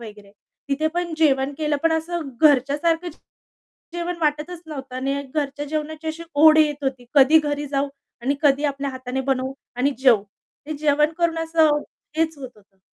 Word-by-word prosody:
वगैरे. 210 -3 -12 0.4
तिथे 285 +3 0
पण 345 -2 -2
जेवण 275 -3 +2
केलं, 300 -2 0
पण 330 0 +3
असं 320 -1 -2
घरच्यासारखं 300 +4 +3 0.9
जेवण 345 0 -3
वाटतच 305 +3 -1
नव्हतं 270 -4 -7
आणि 275 +2 -1
घरच्या 290 -1 -2
जेवणाची 310 +1 -4
अशी 325 +2 -4
ओढ 310 +2 +7
येत 295 -2 +2
होती. 260 -2 -3
कधी 285 +3 +7
घरी 290 -1 -2
जाऊ 280 0 -1 0.3
आणि 275 +3 0
कधी 285 0 +3
आपल्या 280 0 -2
हाताने 260 0 -4
बनवू 260 +1 -1 0.2
आणि 270 +4 +1
जेऊ. 240 -7 +5 0.4
ते 310 - -4
जेवण 300 +1 +2
करून 335 -1 +1
असं 320 -2 +3 0.4
हेच 320 -2 0
होत 260 -2 -7
होतं. 195 -2 -26
295 Hz, 160 wpm, -22 LUFS, 270-315 Hz, 0.9 s, ओढ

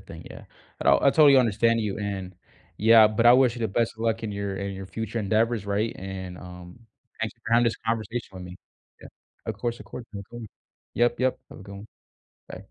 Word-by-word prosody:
thing, - - -12
yeah. - - -11 0.4
Oh, - - +6
I 140 - +3
totally 145 -3 +6
understand 115 -1 +3
you, 105 -3 -2
and 95 -3 -5 0.4
yeah, 110 0 +7
but 110 +2 0
I 120 - +9
wish 125 -2 +4
you 120 - -8
the 110 - 0
best 115 +3 0
of 110 - -15
luck 115 0 -1
in 105 - -4
your 100 -1 -4
in 100 0 -4
your 95 0 -8
future 110 +4 -4
endeavors, 110 +1 0
right? 100 +3 -1
And, 95 -1 -7
um, 90 +3 -12 0.4
thanks 115 0 -3
for 115 -1 -6
having 120 +1 +5
this 115 - 0
conversation 115 +1 -2
with 95 -1 -9
me. 90 0 -9 0.4
Yeah. - - -11 0.4
Of - - -3
course, 120 -1 -3
of - - -13
course, 125 - -8
welcome. 110 +2 -9 0.5
Yep, 120 +1 +1
yep. 130 0 +1
Have - - -12
a - - -10
good 100 0 -11
one. 105 +2 -10 0.6
Bye. - - -8
110 Hz, 215 wpm, -25 LUFS, 100-115 Hz, 0.6 s, I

